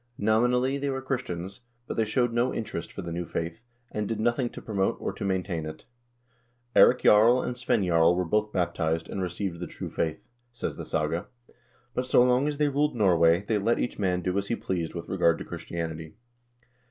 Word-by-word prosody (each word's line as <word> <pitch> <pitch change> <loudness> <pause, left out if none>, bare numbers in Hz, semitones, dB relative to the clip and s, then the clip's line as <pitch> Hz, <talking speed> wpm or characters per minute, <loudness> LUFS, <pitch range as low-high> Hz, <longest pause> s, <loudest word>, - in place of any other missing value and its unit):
Nominally 125 +5 +2
they 140 0 -1
were 135 -1 -2
Christians, 120 -8 -4 0.2
but - - -5
they 110 - +2
showed 120 +2 +1
no 120 +2 +2
interest 100 -6 -4
for 100 - -7
the 85 - -5
new 85 +1 -2
faith, 85 +8 -4 0.3
and 105 -1 -2
did 110 -2 -3
nothing 120 +2 +1
to - - -9
promote 100 -3 -1
or - - -3
to - - -7
maintain 95 -4 -1
it. 80 - -9 0.4
" 120 0 -41
Eirik 125 - +6
Jarl 115 +4 +6
and 125 - -3
Svein 120 -5 +1
Jarl 85 0 +4
were 90 0 0
both 105 +4 0
baptized, 85 -3 -1
and 95 - -4
received 90 -1 -3
the 90 - -4
true - - -7
faith," 80 -2 -3 0.2
says 120 - -4
the - - -7
saga, 80 +4 -1 0.7
"but 125 0 -2
so 125 - +5
long 125 +3 +3
as 150 -1 -2
they 150 0 +2
ruled 145 +1 +1
Norway, 90 -3 +4
they 110 -2 +1
let 115 +4 +2
each 120 - -3
man 90 -3 0
do 90 +1 -1
as 100 - -4
he 115 - 0
pleased 85 -6 -3
with 85 - -6
regard 90 -3 +2
to - - -7
Christianity." 80 -2 -6
100 Hz, 205 wpm, -27 LUFS, 85-120 Hz, 0.7 s, Eirik